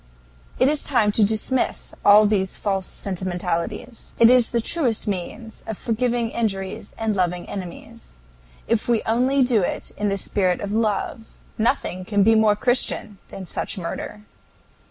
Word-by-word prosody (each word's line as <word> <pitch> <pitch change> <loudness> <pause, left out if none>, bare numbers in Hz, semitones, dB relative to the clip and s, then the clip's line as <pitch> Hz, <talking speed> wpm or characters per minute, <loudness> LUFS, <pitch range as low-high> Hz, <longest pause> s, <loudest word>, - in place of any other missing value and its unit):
It 255 - +4
is 295 +1 +1
time 225 -6 +2
to 215 - +2
dismiss 220 +5 -1
all 210 +1 +7
these 195 -3 0
false 195 -2 -1
sentimentalities. 185 +4 -4
It 230 +1 +7
is 250 -2 +5
the 235 - 0
truest 245 -2 0
means 210 +4 -5
of 220 - -4
forgiving 235 0 -1
injuries 195 -4 -3
and 220 -2 -1
loving 180 -2 -1
enemies. 170 - -9 0.5
If 230 -2 0
we 235 -2 +2
only 255 +4 +2
do 245 -4 +2
it 175 - -3
in 205 0 0
the 195 - -1
spirit 185 -2 0
of 200 - -4
love, 220 +1 -2 0.2
nothing 220 -5 0
can 205 +1 +2
be 225 +3 +5
more 220 -1 +4
Christian 220 -3 0
than 195 - -8
such 190 - -4
murder." 190 +4 -6
215 Hz, 155 wpm, -22 LUFS, 195-230 Hz, 0.5 s, all